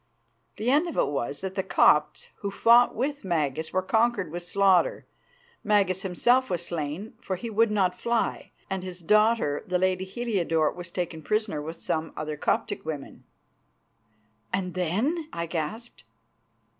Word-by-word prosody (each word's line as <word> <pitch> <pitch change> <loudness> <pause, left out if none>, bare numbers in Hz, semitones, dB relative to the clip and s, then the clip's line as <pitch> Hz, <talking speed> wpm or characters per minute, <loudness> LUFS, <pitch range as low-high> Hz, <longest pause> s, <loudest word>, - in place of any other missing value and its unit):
The 225 +4 0
end 305 +5 +3
of 335 - -6
it - - +2
was 140 0 -3
that 190 0 -4
the 190 - 0
Copts 150 -5 +3
who 200 - -4
fought 235 +4 +5
with 285 +5 -2
Magas 160 -4 -1
were 185 0 0
conquered 215 -3 +1
with 175 +1 -4
slaughter, 195 - +2 0.6
Magas 195 -3 +2
himself 240 +7 +2
was 175 -2 -2
slain, 165 +6 -4
for 190 - -3
he 225 +5 -6
would 225 +2 +3
not 195 -4 +2
fly, 235 +4 -1 0.2
and 190 -1 -3
his 180 -1 -7
daughter, 215 -6 +3
the 180 0 +1
lady 185 0 +1
Heliodore, 190 -7 0
was 175 -1 -9
taken 175 -2 -4
prisoner 210 -3 -1
with 160 +3 -6
some 160 -1 -3
other 155 0 -3
Coptic 150 - -1
women." 150 -3 -7 1.3
"And 185 -1 -2
then?" 220 - -1
I 170 - -3
gasped. 175 +9 -5
185 Hz, 155 wpm, -26 LUFS, 165-220 Hz, 1.3 s, fought